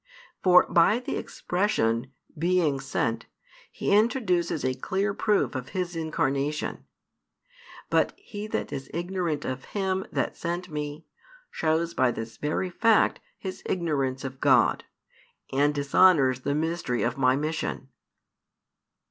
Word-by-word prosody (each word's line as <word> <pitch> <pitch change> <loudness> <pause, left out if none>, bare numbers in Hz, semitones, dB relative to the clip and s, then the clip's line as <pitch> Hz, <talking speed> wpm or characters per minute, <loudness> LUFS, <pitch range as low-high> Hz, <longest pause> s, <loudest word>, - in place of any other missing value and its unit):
For 180 -1 +6
by 170 +6 +4
the 250 - -4
expression 135 - -1 0.2
"being 165 -3 +1
sent," 115 -3 -2 0.4
He 200 - +1
introduces 205 - +1
a 130 - +1
clear 190 +10 -1
proof 210 0 +1
of 130 -2 -5
His 180 -1 -2
Incarnation. 150 -2 -1 1.1
But - - +3
he 210 - -7
that - - -3
is 135 -1 -6
ignorant 175 -3 -2
of 130 +1 -4
Him 190 -1 -1
that - - -1
sent 175 +1 -4
Me, 150 +1 -5 0.5
shows 165 +1 0
by 130 -4 +3
this 115 -1 -5
very 155 +5 -2
fact 225 +4 +3 0.2
his 190 -1 -6
ignorance 140 -7 -1
of 130 0 -7
God, 130 -4 +4 0.7
and 145 +2 +3
dishonours 140 -2 +4
the 140 +2 -1
mystery 160 -6 -1
of 120 +1 0
My 130 -1 +3
mission. 150 -2 -3
155 Hz, 125 wpm, -27 LUFS, 135-185 Hz, 1.1 s, For